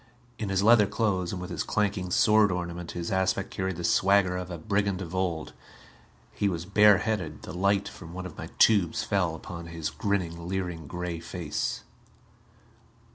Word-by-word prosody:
In 105 - -3
his 95 0 +1
leather 110 -2 +6
clothes, 100 -4 0
and 95 - -4
with 90 +1 -6
his - - -2
clanking 100 -3 -1
sword 105 +1 +4
ornament, 85 -1 -4
his 85 -1 -4
aspect 95 +1 0
carried 95 -1 -2
the 85 - -6
swagger 95 +1 +3
of 90 0 -4
a 85 - -5
brigand 100 +2 0
of 90 -2 -6
old. 90 -4 -2 0.8
He 100 - 0
was 85 -2 -3
bare 105 +1 +6
headed; 100 -8 -3
the - - -7
light 100 +2 +1
from 85 -3 -10
one 90 +1 -6
of 90 - -8
my - - -7
tubes 100 -7 +4
fell 90 -6 0
upon 85 +1 -8
his 85 -2 -4
grinning, 85 -4 -2
leering 90 -4 -3
gray 90 +1 -4
face. 85 -2 -3
90 Hz, 175 wpm, -28 LUFS, 85-100 Hz, 0.8 s, leather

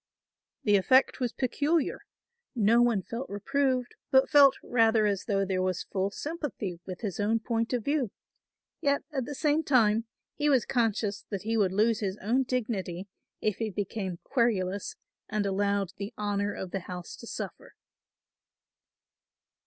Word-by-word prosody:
The 205 -2 +5
effect 260 +8 +4
was 245 -2 0
peculiar; 290 +5 0 0.6
no 230 +1 +4
one 235 -6 +2
felt 235 +7 -5
reproved, 255 +4 0 0.2
but 265 0 +4
felt 285 -3 +7
rather 225 -2 +3
as 200 -2 0
though 195 -2 +1
there 185 -1 0
was 185 -1 -1
full 195 0 -1
sympathy 245 - -5
with 185 -1 -6
his 200 -6 -4
own 220 +2 +2
point 230 0 -1
of 245 -4 -1
view; 280 -5 +1 0.7
yet 280 -2 +1
at 265 -4 -1
the 290 - -6
same 300 +2 +2
time 230 -5 +3 0.3
he 295 0 0
was 260 -5 +3
conscious 220 -4 0
that 200 -2 -4
he 225 +1 -1
would 200 -4 +2
lose 215 +3 +2
his 200 -3 -2
own 235 +7 +1
dignity 200 -7 -3 0.3
if 215 -2 0
he 225 -1 -2
became 195 -2 -3
querulous 205 -6 0 0.3
and 210 -1 0
allowed 200 -1 0
the 205 +4 -6
honour 205 -1 -1
of 190 -2 -6
the 195 - -2
house 180 -1 -7
to 235 - -11
suffer. - - -7
220 Hz, 155 wpm, -29 LUFS, 200-250 Hz, 0.7 s, felt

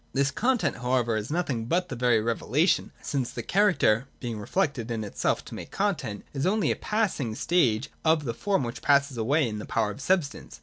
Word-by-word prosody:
This 140 0 +2
content 250 0 +1
however 125 -2 +1
is 110 0 -3
nothing 140 -8 -1
but 175 +9 0
that 130 - -4
very 120 -2 +3
revelation, 120 - +1
since 135 -4 -1
the - - -6
character 175 - +3
(being 120 -4 -4
reflected 135 - -1
in 115 -2 -2
itself 105 - -1
to - - -10
make - - -7
content) 155 - -2
is 140 +3 0
only 210 +2 +2
a - - 0
passing 195 - -1
stage 130 -7 +1
of 160 -1 +3
the 115 - -2
form 195 - 0
which 120 0 -5
passes 140 -1 +3
away 135 +5 +2
in 105 -2 -4
the 105 - -6
power 110 -2 0
of 135 - -9
substance. 165 -2 -1
135 Hz, 200 wpm, -27 LUFS, 115-175 Hz, -, very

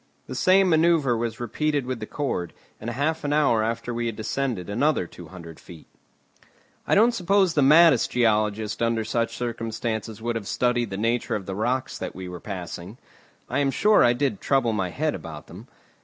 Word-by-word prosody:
The - - -7
same 185 +8 +4
manoeuvre 160 -6 +3
was 115 -1 -3
repeated 145 +4 -1
with 130 -2 -4
the 110 - -6
cord, 135 - -3 0.3
and 115 - -5
half 145 +7 -1
an 145 - -1
hour 140 -7 +3
after 115 +2 -3
we 120 0 -2
had 115 - -3
descended 110 -3 -3
another 125 - +1
two 85 0 -12
hundred 85 -2 -11
feet. 85 -3 -13 1.0
I - - +3
don't 225 +4 +5
suppose 195 -3 +2
the 150 - +2
maddest 150 -1 +6
geologist 110 -2 0
under 115 -1 +1
such 115 +1 -1
circumstances 115 -2 -4
would 120 +1 -3
have 110 -4 -4
studied 120 -2 0
the 95 - -5
nature 115 +3 0
of 100 -3 -4
the 95 - -5
rocks 120 +6 -2
that - - -5
we 95 0 -7
were 90 -1 -7
passing. 95 +1 -7 0.5
I 130 - -1
am 140 -1 +2
sure 210 +9 +4
I 120 - +5
did 145 +10 -1
trouble 135 -5 +1
my 95 -4 -1
head 85 - -1
about - - -8
them. - - -12
120 Hz, 190 wpm, -24 LUFS, 110-140 Hz, 1.0 s, maddest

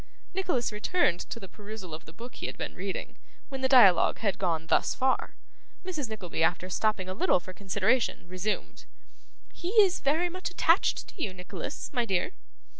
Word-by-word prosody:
Nicholas 350 -12 0
returned 210 - +1
to 230 - -6
the 195 - -9
perusal 205 -4 -9
of 155 - -7
the 160 - -11
book 235 +8 -10
he - - -5
had - - -7
been - - -4
reading, 190 +1 -5 0.3
when 270 -2 -5
the 260 - +2
dialogue 200 -10 +7
had 200 -3 -1
gone 165 -4 0
thus - - +2
far. 260 0 0 0.5
Mrs. 310 -10 -3
Nickleby, 190 -7 -4
after 180 +2 +1
stopping 210 -3 0
a 185 - -3
little 190 - +3
for 185 +2 -10
consideration, 200 +3 0
resumed. 185 +4 -3 0.7
'He 345 - -5
is 380 -3 +5
very 310 +5 +2
much 370 +1 -4
attached 340 +1 +2
to - - -11
you, 195 - -1
Nicholas, 180 0 -6
my 245 -3 +1
dear. 190 - 0
215 Hz, 180 wpm, -29 LUFS, 185-265 Hz, 0.7 s, dialogue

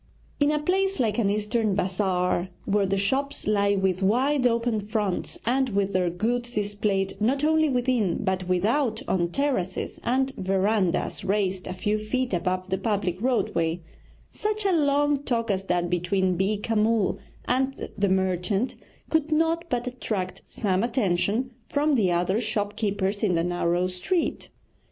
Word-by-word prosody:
In 290 0 +4
a 300 - +2
place 380 +4 0
like 225 -2 +1
an 205 -4 +2
Eastern 210 0 0
bazaar, 185 -1 0 0.2
where 200 -1 +2
the 195 +1 0
shops 270 +8 0
lie 200 -1 +2
with 190 -1 0
wide 250 +7 +3
open 230 -1 0
fronts, 210 -2 -2
and 260 +2 +2
with 200 -1 0
their 180 -1 +2
goods 240 +7 -2
displayed 205 -2 0
not 270 +6 +1
only 315 0 +3
within 245 -6 +1
but 190 -2 -1
without 220 +6 +1
on 175 -2 +1
terraces 220 -7 -2
and 265 +2 +1
verandahs 190 -1 0
raised 190 -2 0
a 185 - -3
few 210 +3 0
feet 245 +3 -2
above 185 +1 -1
the 190 - 0
public 195 -3 -1
roadway, 175 -9 0 0.5
such 425 0 -2
a 390 - +3
long 290 -3 +2
talk 230 -5 -1
as 195 0 -1
that 175 -1 0
between 180 +1 +1
Beeka 205 +4 -1
Mull 215 -1 +2 0.3
and 265 +2 -1
the 200 -1 +1
merchant 190 +4 0 0.4
could 315 -1 +1
not 325 +2 +2
but 245 0 -1
attract 215 -7 -4
some 190 -4 -1
attention 230 +1 0 0.2
from 295 +1 +2
the 205 -9 +3
other 180 +5 +1
shop 210 -2 -2
keepers 200 -2 -1
in 195 -5 +2
the 165 - +1
narrow 175 0 0
street. 185 - -2
210 Hz, 155 wpm, -26 LUFS, 190-250 Hz, 0.5 s, In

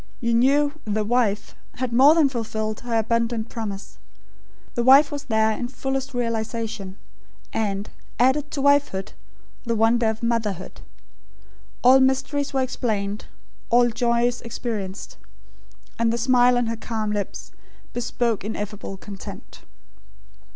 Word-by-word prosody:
You 235 -1 0
knew 280 +5 +3
"The 215 0 0
Wife" 215 -2 0 0.2
had 250 -1 -3
more 275 +6 +7
than 320 -4 +5
fulfilled 220 -4 -3
her 235 -1 -2
abundant 230 0 0
promise. 205 -4 -6 0.7
The 240 - 0
wife 275 +4 +7
was 290 0 -5
there 220 -3 +2
in 240 +3 -3
fullest 270 +1 -4
realisation; 225 -4 -3 0.6
and, 205 -2 -1 0.3
added 265 +4 +2
to 275 - -3
wifehood, 285 -9 +2 0.5
the 230 -1 -1
wonder 225 +1 +3
of 220 +1 -4
motherhood. 220 -6 -2 1.0
All 260 +2 +7
mysteries 270 +2 +1
were 265 -1 +1
explained; 210 -5 -2 0.4
all 240 0 +4
joys 235 +1 +1
experienced; 215 -5 -5 0.8
and 230 0 +3
the 235 - -1
smile 245 0 +4
on 245 - +1
her 230 0 -3
calm 220 -2 -3
lips, 205 -1 -4 0.4
bespoke 235 -2 -1
ineffable 210 -2 -5
content. 195 0 -10
235 Hz, 125 wpm, -23 LUFS, 215-255 Hz, 1.0 s, more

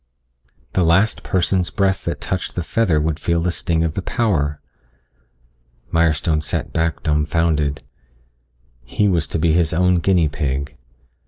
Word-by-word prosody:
The 95 - +2
last 95 +7 +2
person's 90 -1 0
breath 95 -1 0
that - - -3
touched 95 - -4
the 90 - -2
feather 90 -4 +1
would 80 0 -1
feel 85 -1 0
the 90 +1 0
sting 85 -2 -1
of 80 -2 -1
the 95 - -3
power. 85 - 0 1.3
Mirestone 80 -1 +2
sat - - -3
back 80 -2 -1
dumbfounded. 75 -1 0 1.0
He 105 +12 0
was 85 -7 +1
to - - -2
be 80 +1 +2
his 85 -1 +2
own 90 +1 +3
guinea 85 -2 +2
pig. 70 0 -3
80 Hz, 145 wpm, -20 LUFS, 75-90 Hz, 1.3 s, own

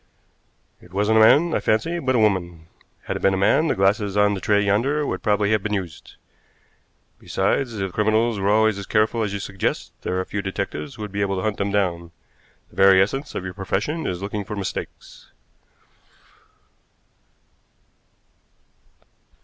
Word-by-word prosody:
"It 90 - -18
wasn't 105 +3 +2
a - - +6
man, 155 +9 +5
I - - +1
fancy, 165 +11 0
but 130 -5 0
a - - +3
woman. 90 -7 0 0.4
Had - - -3
it - - -10
been 95 0 +3
a - - -2
man, 105 +11 +3
the - - +1
glasses 100 +1 +1
on 105 0 +4
the 95 - -5
tray 105 +1 +2
yonder 135 +9 +1
would - - -3
probably 105 -1 +1
have 110 -2 +2
been 105 +1 -2
used. 90 -5 -7 1.0
Besides, 115 +5 -1
if 95 -2 -3
criminals 110 +1 +1
were 100 +1 0
always 110 -1 +3
as 100 - -8
careful 110 +1 +1
as 105 -2 -1
you 100 - -3
suggest, 95 -1 -3
there 90 - -2
are 95 - -2
few 100 - -4
detectives 95 -7 -5
who 110 - -7
would 105 - -6
be 100 +1 -3
able 100 -1 0
to 95 - -3
hunt 110 -1 -1
them 100 0 -1
down. 90 -4 -1 0.6
The - - -20
very 95 -1 +6
essence 135 +9 -1
of - - -3
your 95 - -5
profession 105 - -2
is 90 +1 -4
looking 100 +1 -3
for 105 +2 -6
mistakes." 100 -2 -7
100 Hz, 175 wpm, -22 LUFS, 95-110 Hz, 1.0 s, a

